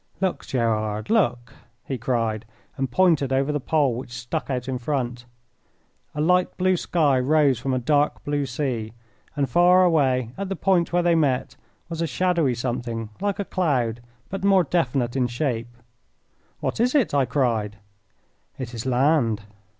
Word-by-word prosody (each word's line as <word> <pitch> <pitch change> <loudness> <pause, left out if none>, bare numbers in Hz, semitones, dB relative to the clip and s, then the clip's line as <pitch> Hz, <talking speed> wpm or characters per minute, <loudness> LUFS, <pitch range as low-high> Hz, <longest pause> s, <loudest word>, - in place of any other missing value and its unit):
"Look, 190 -2 -2
Gerard, 110 - -1
look!" 125 - +1 0.3
he 130 -3 -3
cried, 115 -2 -1 0.3
and 135 -1 -2
pointed 150 -2 +2
over 135 +2 +1
the 150 - -1
pole 145 -2 +1
which 125 +2 -6
stuck 125 +6 -4
out 125 -1 -2
in 130 -1 -2
front. 125 -2 -3 0.9
A - - -4
light 180 +3 +2
blue 185 0 +2
sky 150 -6 +2
rose 140 -1 +3
from 135 +2 -2
a 130 - +1
dark 145 +4 +1
blue 145 -1 -1
sea, 120 -4 -3 0.4
and 140 -2 0
far 180 +6 +5
away, 130 -8 +2
at 200 -1 -3
the 195 - -2
point 185 -4 +1
where 175 0 +2
they 170 0 +3
met, 140 -6 +1 0.3
was 165 -1 -5
a 165 - 0
shadowy 165 -2 +1
something 120 -2 -3
like 200 0 -1
a 200 - -3
cloud, 125 -12 0 0.3
but 195 0 -4
more 195 -2 +5
definite 135 -7 0
in 130 -2 +1
shape. 120 -2 -2 0.9
"What - - -2
is 250 +4 +2
it?" 270 - +2
I 140 -2 +3
cried. 115 -6 0 0.8
"It 125 -3 -6
is 115 +2 -5
land." 125 -4 +2
135 Hz, 165 wpm, -24 LUFS, 120-165 Hz, 0.9 s, far